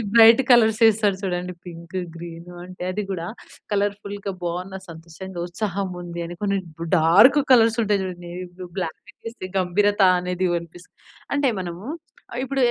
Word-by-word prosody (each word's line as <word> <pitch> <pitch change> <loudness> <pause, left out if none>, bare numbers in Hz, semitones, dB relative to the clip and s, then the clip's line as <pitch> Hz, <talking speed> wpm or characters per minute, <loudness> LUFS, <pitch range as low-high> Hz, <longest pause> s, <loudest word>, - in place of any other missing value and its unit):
కొంతమంది 225 - -3
bright 230 +2 +8
colours 225 -2 +5
వేస్తారు 210 -3 +4
చూడండి, 180 -1 -2
పింకు 170 +2 -6 0.2
గ్రీను 170 +1 -9
అంటే, 180 0 -8
అది 210 - -2
గూడా 170 -3 -3 0.5
కలర్‌ఫుల్‌గా 200 0 -2
బాగున్న 180 +3 -3
సంతోషంగా, 170 +3 -9
ఉత్సాహం 195 +1 -3
ఉంది 170 0 -6
అని, 175 - -7
కొన్ని 200 -1 +1 0.4
డార్క్ 205 - +6
కలర్స్ 230 -1 +5
ఉంటాయి 200 -1 +1
చూడండి, 175 -1 -7
ఏ - - -5
బ్లూ, 185 - -6
బ్లాక్ 165 -3 -3 0.3
ఏస్తే 185 -5 -8
గంభీరత 205 +3 +2 0.2
అనేది 180 +1 -1
వినిపిస్తుంది. 170 +1 -10 0.4
అంటే, 280 -2 +2
మనము 175 +2 -6 0.5
ఆహ్, - - -3
ఇప్పుడు 270 0 -1
190 Hz, 150 wpm, -23 LUFS, 175-210 Hz, 0.5 s, bright